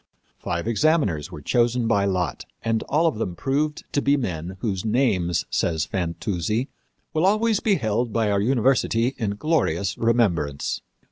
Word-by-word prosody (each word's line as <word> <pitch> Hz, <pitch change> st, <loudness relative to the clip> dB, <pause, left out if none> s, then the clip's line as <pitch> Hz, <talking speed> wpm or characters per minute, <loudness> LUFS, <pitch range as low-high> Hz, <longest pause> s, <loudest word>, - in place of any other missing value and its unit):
Five 85 Hz, +3 st, -3 dB
examiners 115 Hz, -, +1 dB
were 75 Hz, -, -9 dB
chosen 120 Hz, -, +2 dB
by 100 Hz, -3 st, +2 dB
lot, 90 Hz, -3 st, -1 dB, 0.2 s
and 115 Hz, -1 st, 0 dB
all 155 Hz, +4 st, +2 dB
of 155 Hz, -10 st, +1 dB
them 90 Hz, -6 st, -2 dB
proved 150 Hz, -, -1 dB
to 145 Hz, -, +2 dB
be 140 Hz, +1 st, +3 dB
men 90 Hz, -, -4 dB
whose 95 Hz, -5 st, -2 dB
names, 105 Hz, -8 st, +1 dB
says 80 Hz, -2 st, 0 dB
Fantuzzi, 95 Hz, -, -2 dB, 0.4 s
"will 155 Hz, -, +1 dB
always 215 Hz, +1 st, +2 dB
be 210 Hz, -3 st, +2 dB
held 115 Hz, -, -1 dB
by 110 Hz, -1 st, +1 dB
our 100 Hz, -1 st, +2 dB
university 125 Hz, 0 st, +2 dB
in 100 Hz, -3 st, -1 dB
glorious 100 Hz, -, 0 dB
remembrance." 100 Hz, -12 st, +1 dB
110 Hz, 150 wpm, -24 LUFS, 90-135 Hz, 0.4 s, be